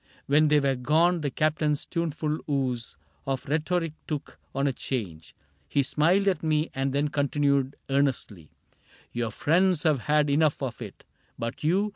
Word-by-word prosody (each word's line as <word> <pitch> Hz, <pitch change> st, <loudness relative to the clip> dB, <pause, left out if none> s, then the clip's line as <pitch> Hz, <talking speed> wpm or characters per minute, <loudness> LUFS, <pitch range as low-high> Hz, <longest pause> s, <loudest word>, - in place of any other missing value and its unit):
When 150 Hz, +2 st, +4 dB
they 150 Hz, 0 st, +4 dB
were 140 Hz, -1 st, +1 dB
gone 160 Hz, +7 st, +2 dB
the 145 Hz, -, -1 dB
Captain's 150 Hz, +1 st, 0 dB
tuneful 155 Hz, -2 st, -2 dB
ooze 130 Hz, -5 st, -2 dB, 0.3 s
Of 135 Hz, -1 st, -2 dB
rhetoric 160 Hz, +2 st, -1 dB
took 150 Hz, -2 st, -5 dB, 0.2 s
on 135 Hz, +1 st, +1 dB
a 140 Hz, -, +1 dB
change; 95 Hz, -13 st, -5 dB, 0.3 s
he 140 Hz, -, +2 dB
smiled 170 Hz, +9 st, +2 dB
At 190 Hz, -, +2 dB
me 155 Hz, 0 st, 0 dB
and 135 Hz, 0 st, -1 dB
then 145 Hz, +2 st, 0 dB
continued, 140 Hz, -1 st, +1 dB
earnestly: 130 Hz, -, -1 dB, 0.3 s
" -, -, -29 dB
Your 120 Hz, -1 st, -2 dB
friends 170 Hz, -, +2 dB
have 155 Hz, -4 st, +3 dB
had 150 Hz, +4 st, +2 dB
enough 145 Hz, 0 st, +2 dB
of 125 Hz, -2 st, -4 dB
it; 105 Hz, -4 st, -9 dB, 0.3 s
but 115 Hz, +5 st, -5 dB
you. 190 Hz, +7 st, +2 dB
145 Hz, 160 wpm, -27 LUFS, 135-155 Hz, 0.3 s, When